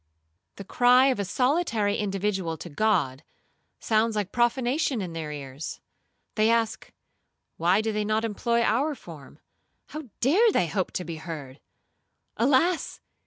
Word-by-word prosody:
The 200 Hz, -, -8 dB
cry 250 Hz, +6 st, +4 dB
of 255 Hz, -, 0 dB
a -, -, 0 dB
solitary 240 Hz, -, +1 dB
individual 195 Hz, -4 st, -2 dB
to 175 Hz, -, -9 dB
God, 165 Hz, -8 st, 0 dB, 0.6 s
sounds 220 Hz, 0 st, +1 dB
like 205 Hz, -3 st, -2 dB
profanation 245 Hz, +2 st, +1 dB
in 180 Hz, -4 st, -5 dB
their 160 Hz, -2 st, -5 dB
ears. 140 Hz, 0 st, -7 dB, 0.5 s
They 215 Hz, 0 st, +2 dB
ask, 230 Hz, -1 st, 0 dB, 0.7 s
Why 180 Hz, +5 st, +3 dB
do 220 Hz, 0 st, -1 dB
they 210 Hz, 0 st, -1 dB
not 215 Hz, +2 st, 0 dB
employ 235 Hz, +2 st, 0 dB
our 280 Hz, +8 st, +1 dB
form? 155 Hz, -, -13 dB, 0.5 s
How 305 Hz, 0 st, -7 dB
dare 390 Hz, -, +4 dB
they -, -, +2 dB
hope 180 Hz, +3 st, -2 dB
to 180 Hz, -, -3 dB
be 165 Hz, -1 st, -6 dB
heard? 155 Hz, -5 st, -8 dB, 0.8 s
Alas! 285 Hz, +8 st, +1 dB
215 Hz, 140 wpm, -26 LUFS, 175-245 Hz, 0.8 s, cry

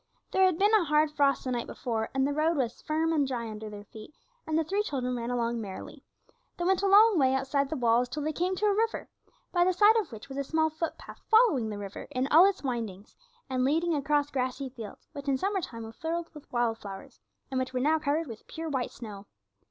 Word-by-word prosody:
There 380 Hz, -, +4 dB
had 365 Hz, -3 st, +2 dB
been 410 Hz, +4 st, +3 dB
a 430 Hz, -4 st, +6 dB
hard 300 Hz, 0 st, +3 dB
frost 280 Hz, -2 st, +2 dB
the 255 Hz, -, -3 dB
night 240 Hz, -1 st, -2 dB
before, 225 Hz, -2 st, -3 dB
and 270 Hz, 0 st, +2 dB
the 285 Hz, -, 0 dB
road 315 Hz, +2 st, +1 dB
was 240 Hz, -4 st, -2 dB
firm 320 Hz, +1 st, 0 dB
and 290 Hz, -3 st, +2 dB
dry 240 Hz, -3 st, -3 dB
under 215 Hz, 0 st, -7 dB
their 205 Hz, -1 st, -9 dB
feet, 215 Hz, +6 st, -13 dB, 0.3 s
and 315 Hz, 0 st, +1 dB
the 325 Hz, -, +2 dB
three 395 Hz, +6 st, 0 dB
children 255 Hz, -10 st, -2 dB
ran 235 Hz, 0 st, -3 dB
along 235 Hz, -1 st, -1 dB
merrily. 195 Hz, -3 st, -8 dB, 0.5 s
They 345 Hz, -, -2 dB
went 380 Hz, +1 st, +2 dB
a 400 Hz, -, +2 dB
long 410 Hz, -1 st, +6 dB
way 265 Hz, -1 st, +3 dB
outside 275 Hz, +1 st, 0 dB
the 315 Hz, -, -2 dB
walls 245 Hz, -1 st, +2 dB
till 295 Hz, +3 st, -4 dB
they 310 Hz, +1 st, -1 dB
came 360 Hz, +4 st, 0 dB
to 420 Hz, -, -1 dB
a 415 Hz, -, +4 dB
river, 450 Hz, +2 st, -1 dB, 0.4 s
by 350 Hz, -1 st, +3 dB
the 370 Hz, +1 st, +2 dB
side 420 Hz, +4 st, +6 dB
of 435 Hz, -, -1 dB
which 220 Hz, +3 st, -9 dB
was 270 Hz, 0 st, -6 dB
a -, -, 0 dB
small 315 Hz, +2 st, +1 dB
footpath 325 Hz, +1 st, -6 dB
following 435 Hz, -, +4 dB
the 210 Hz, -, -5 dB
river 200 Hz, -1 st, -7 dB
in 260 Hz, -2 st, -1 dB
all 335 Hz, +5 st, +8 dB
its 390 Hz, -, -5 dB
windings, 225 Hz, -6 st, -4 dB, 0.3 s
and 255 Hz, -2 st, 0 dB
leading 325 Hz, +5 st, +2 dB
across 290 Hz, 0 st, +1 dB
grassy 260 Hz, +1 st, -2 dB
fields, 230 Hz, -5 st, -10 dB
which 280 Hz, 0 st, -8 dB
in 270 Hz, -1 st, +2 dB
summer 390 Hz, +6 st, -1 dB
time 230 Hz, -7 st, -7 dB
were 225 Hz, 0 st, -9 dB
filled 330 Hz, +5 st, -4 dB
with 300 Hz, -2 st, -13 dB
wild 235 Hz, -2 st, 0 dB
flowers, 195 Hz, -1 st, -10 dB, 0.3 s
and 260 Hz, -, 0 dB
which 260 Hz, 0 st, -2 dB
were 255 Hz, -, -1 dB
now 310 Hz, +5 st, +2 dB
covered 305 Hz, +2 st, 0 dB
with 225 Hz, -6 st, -10 dB
pure 325 Hz, 0 st, -5 dB
white 260 Hz, -4 st, -1 dB
snow. 205 Hz, -4 st, -10 dB
280 Hz, 240 wpm, -29 LUFS, 240-325 Hz, 0.5 s, all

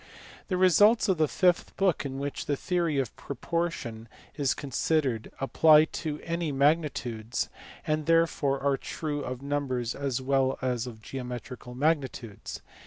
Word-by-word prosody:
The 185 Hz, -, 0 dB
results 205 Hz, +5 st, +5 dB
of 185 Hz, -4 st, +2 dB
the 155 Hz, -, +4 dB
fifth 180 Hz, +3 st, +1 dB
book 185 Hz, -7 st, +1 dB
in 135 Hz, 0 st, -6 dB
which 140 Hz, +1 st, -4 dB
the 145 Hz, -, +1 dB
theory 170 Hz, -3 st, 0 dB
of 130 Hz, -5 st, -1 dB
propor 170 Hz, +6 st, -2 dB
tion 115 Hz, -6 st, -7 dB, 0.3 s
is 140 Hz, -3 st, 0 dB
considered 135 Hz, -3 st, -1 dB
apply 155 Hz, +3 st, +6 dB, 0.2 s
to 150 Hz, -2 st, -3 dB
any 170 Hz, -2 st, -2 dB
magnitudes, 135 Hz, -6 st, 0 dB, 0.4 s
and 155 Hz, 0 st, -1 dB
therefore 165 Hz, -4 st, +2 dB
are 140 Hz, -1 st, +2 dB
true 145 Hz, -1 st, -4 dB
of 130 Hz, +1 st, -5 dB
numbers 135 Hz, -4 st, -1 dB
as 140 Hz, -3 st, -2 dB
well 135 Hz, 0 st, +1 dB
as 125 Hz, -2 st, -1 dB
of 110 Hz, -3 st, -10 dB
geometrical 125 Hz, -1 st, -7 dB
magnitudes. 130 Hz, -7 st, -2 dB
140 Hz, 145 wpm, -28 LUFS, 130-160 Hz, 0.4 s, apply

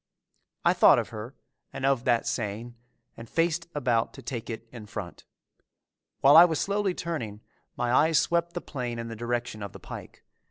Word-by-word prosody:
I -, -, +6 dB
thought -, -, +7 dB
of -, -, -1 dB
her 115 Hz, +4 st, -8 dB, 0.4 s
and 135 Hz, -, -4 dB
of 135 Hz, -3 st, +2 dB
that 120 Hz, -2 st, +2 dB
saying 115 Hz, +1 st, -3 dB, 0.4 s
and 115 Hz, 0 st, -11 dB
faced 170 Hz, 0 st, 0 dB
about 120 Hz, -5 st, 0 dB
to 135 Hz, -, -11 dB
take 115 Hz, -1 st, -5 dB
it 115 Hz, 0 st, -6 dB
in 115 Hz, -4 st, -10 dB
front. 100 Hz, -5 st, -7 dB, 1.0 s
While 140 Hz, +2 st, +7 dB
I 165 Hz, -, +12 dB
was 165 Hz, -3 st, +2 dB
slowly 200 Hz, -2 st, 0 dB
turning, 120 Hz, -12 st, -4 dB, 0.4 s
my 120 Hz, 0 st, 0 dB
eyes 160 Hz, +4 st, +4 dB
swept 170 Hz, 0 st, 0 dB
the 175 Hz, -, -4 dB
plain 125 Hz, -4 st, -5 dB
in 115 Hz, 0 st, -5 dB
the 115 Hz, -, -6 dB
direction 120 Hz, -1 st, -3 dB
of 100 Hz, -2 st, -6 dB
the -, -, -10 dB
pike. -, -, -10 dB
120 Hz, 185 wpm, -27 LUFS, 115-160 Hz, 1.0 s, I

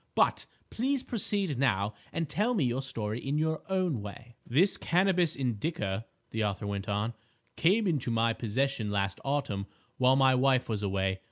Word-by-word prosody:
But, -, -, +2 dB, 0.2 s
please 265 Hz, +3 st, 0 dB
proceed 200 Hz, -, -1 dB
now 105 Hz, -6 st, +1 dB, 0.2 s
and 165 Hz, -, -2 dB
tell 215 Hz, -, +1 dB
me 180 Hz, -, +2 dB
your 125 Hz, +1 st, 0 dB
story 115 Hz, -4 st, -3 dB
in 140 Hz, +2 st, -1 dB
your 160 Hz, 0 st, 0 dB
own 185 Hz, -, 0 dB
way." 115 Hz, +3 st, -9 dB
"This 175 Hz, +11 st, +4 dB
Cannabis 180 Hz, -2 st, +2 dB
indica," 115 Hz, -, -2 dB, 0.2 s
the 110 Hz, 0 st, -1 dB
author 105 Hz, 0 st, -2 dB
went 100 Hz, -1 st, -3 dB
on, 105 Hz, +3 st, 0 dB, 0.4 s
"came 200 Hz, +7 st, +3 dB
into 150 Hz, -9 st, 0 dB
my 115 Hz, 0 st, +2 dB
possession 120 Hz, 0 st, -1 dB
last 100 Hz, -1 st, -1 dB
autumn 135 Hz, -8 st, -1 dB, 0.3 s
while 130 Hz, +1 st, +5 dB
my 135 Hz, -1 st, +5 dB
wife 130 Hz, 0 st, +3 dB
was 110 Hz, -3 st, -2 dB
away. 95 Hz, -1 st, 0 dB
130 Hz, 165 wpm, -30 LUFS, 105-165 Hz, 0.4 s, while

